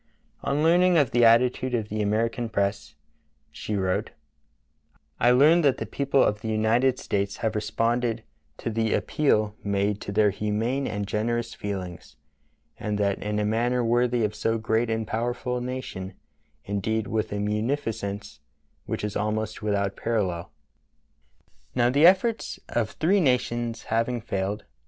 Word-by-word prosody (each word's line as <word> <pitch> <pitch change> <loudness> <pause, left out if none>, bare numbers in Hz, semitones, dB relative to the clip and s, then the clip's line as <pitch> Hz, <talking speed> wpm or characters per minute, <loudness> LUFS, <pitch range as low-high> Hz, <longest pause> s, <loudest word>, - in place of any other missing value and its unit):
On 145 +2 0
learning 175 +2 +5
of 145 -6 +3
the 120 0 +3
attitude 125 +2 +4
of 110 -3 -2
the 110 +1 -2
American 115 +3 0
press, 100 -1 -2 0.6
she 105 - -4
wrote: 95 -2 0 1.1
"I 120 - +4
learn 150 +7 +6
that 140 -5 +3
the - - -4
people 140 -1 +1
of 105 0 0
the 115 - -5
United 115 +4 +2
States 100 0 -2
have 110 - +1
responded 115 +2 0 0.3
to 115 - -4
the 110 0 +1
appeal 110 -8 +1
made 100 0 0
to - - -5
their 105 0 +3
humane 110 +7 -1
and 105 -1 -3
generous 115 +3 -1
feelings, 95 -4 -6 0.6
and 105 -1 -2
that 100 -1 0
in 105 0 -2
a 105 - +1
manner 120 +3 +1
worthy 120 0 +2
of 105 -1 0
so 115 0 0
great 115 +1 0
and 110 0 -1
powerful 120 +3 -2
a - - -3
nation 120 -7 -5 0.2
— 75 0 -42
indeed, 110 +2 -1
with 110 +1 -2
a 105 - -2
munificence 105 -1 -2 0.5
which - - -3
is 105 -1 -3
almost 110 0 -2
without 100 -2 0
parallel." 95 -7 -2 1.2
Now 120 0 +3
the 145 +5 +6
efforts 205 +5 +2
of 115 -3 -1
three 185 - +2
nations 120 -4 0
having 115 +2 0
failed. 100 -1 -3
110 Hz, 150 wpm, -26 LUFS, 105-125 Hz, 1.2 s, learn